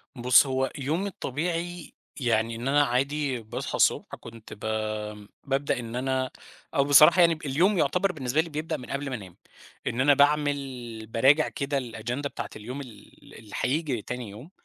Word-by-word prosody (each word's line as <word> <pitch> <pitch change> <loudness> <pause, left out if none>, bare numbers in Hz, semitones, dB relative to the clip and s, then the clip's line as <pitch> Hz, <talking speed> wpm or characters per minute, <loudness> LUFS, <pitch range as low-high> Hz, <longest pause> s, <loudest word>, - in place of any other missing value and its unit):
بُصّ، 125 +2 +5
هو 130 0 0
يومي 155 +8 -1
الطبيعي، 170 0 -4 0.3
يعني 115 -2 +1
إن 120 +3 -5
أنا 145 +1 +4
عادي 140 +1 0
باصحى 110 - -5
الصبح - - +2
كنت 115 -1 -11
ب - - -13 0.8
بابدأ 140 -1 0
إن 115 0 -6
أنا 130 0 -1 0.4
أو 140 - +4
بصراحة 150 +5 +7
يعني 170 -1 +5
ب 155 0 -11
اليوم 175 +9 +2
يُعتبَر 180 +6 +2
بالنسبة 145 -2 0
لي 165 - -7
بيبدأ 155 +1 -3
من 125 - -11
قبل 140 0 -3
ما 130 - -3
أنام، 95 -6 -10 0.5
إن 120 - 0
أنا 145 +2 +6
باعمل، 140 -5 0
باراجع 135 +7 +4
كده 140 0 -2
الagenda 120 +3 -4
بتاعة 115 -5 -6
اليوم 125 +6 -6
ال 115 -6 -14
اللي 110 -2 -15
هييجي 140 -4 0
تاني 125 0 -6
يوم، 120 - -11
135 Hz, 170 wpm, -27 LUFS, 120-150 Hz, 0.8 s, بصراحة